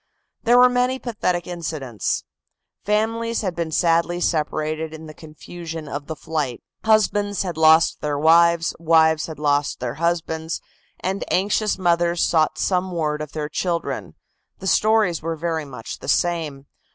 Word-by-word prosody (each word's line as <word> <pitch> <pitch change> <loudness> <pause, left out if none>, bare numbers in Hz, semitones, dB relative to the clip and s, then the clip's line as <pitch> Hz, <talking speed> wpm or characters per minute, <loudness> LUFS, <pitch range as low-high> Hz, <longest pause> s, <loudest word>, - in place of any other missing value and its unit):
There 240 +1 +5
were 250 0 +8
many 250 +1 +1
pathetic 180 -9 -2
incidents. 155 -10 -3 0.6
Families 225 +2 0
had 185 -5 -3
been 170 -1 -2
sadly 170 +1 +2
separated 155 -1 -1
in 160 0 -10
the 155 - -10
confusion 160 +1 -9
of 145 0 -6
the 160 - -4
flight. 150 -6 -3 0.2
Husbands 205 -2 +2
had 180 -3 -4
lost 160 +1 +4
their 145 -1 -1
wives 165 +2 +4
wives 160 -1 +3
had 160 - -8
lost 145 -1 0
their 125 -1 -3
husbands, 165 -1 -1 0.4
and 190 +2 -2
anxious 205 +3 +1
mothers 175 -1 +2
sought 155 -2 +2
some 185 0 0
word 155 -3 -1
of 150 -2 -7
their 150 -1 -3
children 170 +2 -3 0.4
the 190 - -10
stories 215 -4 +3
were 165 +1 -3
very 160 -1 -2
much 125 -5 -8
the - - -10
same. 155 -3 0
165 Hz, 150 wpm, -22 LUFS, 155-185 Hz, 0.6 s, were